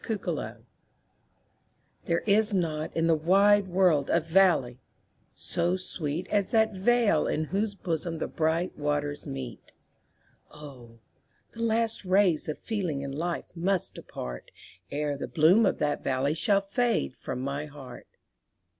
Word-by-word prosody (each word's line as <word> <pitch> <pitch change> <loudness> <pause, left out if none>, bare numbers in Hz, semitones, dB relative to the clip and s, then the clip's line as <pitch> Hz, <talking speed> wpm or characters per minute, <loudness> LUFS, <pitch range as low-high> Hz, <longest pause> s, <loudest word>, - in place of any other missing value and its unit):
There 170 - 0
is 210 0 +3
not 160 -4 -2
in 165 - +2
the 165 - +4
wide 195 +5 +4
world 175 -6 +2
a 170 - +4
valley 165 -7 +2 0.5
so 175 +2 -1
sweet 170 -3 -4
As 205 -2 +1
that 220 -1 +3
vale 205 -3 +2
in 155 - 0
whose 200 +5 -2
bosom 165 -3 -3
the - - -3
bright 165 +3 -1
waters 145 0 -2
meet; 130 -4 -7 0.8
Oh! 125 -6 -12 0.5
the 230 - -9
last 225 -1 0
rays 185 -4 +2
of 150 - -3
feeling 180 -11 -3
and 140 -1 -5
life 170 +4 -4
must 180 +2 0
depart, 60 -1 -8 0.4
Ere 145 0 -2
the 140 - -5
bloom 180 +8 +4
of - - 0
that 145 -1 -1
valley 135 +2 0
shall 195 +5 +2
fade 225 - 0
from 125 - -5
my 140 +3 -3
heart. 135 -4 -11
165 Hz, 135 wpm, -28 LUFS, 145-195 Hz, 0.8 s, the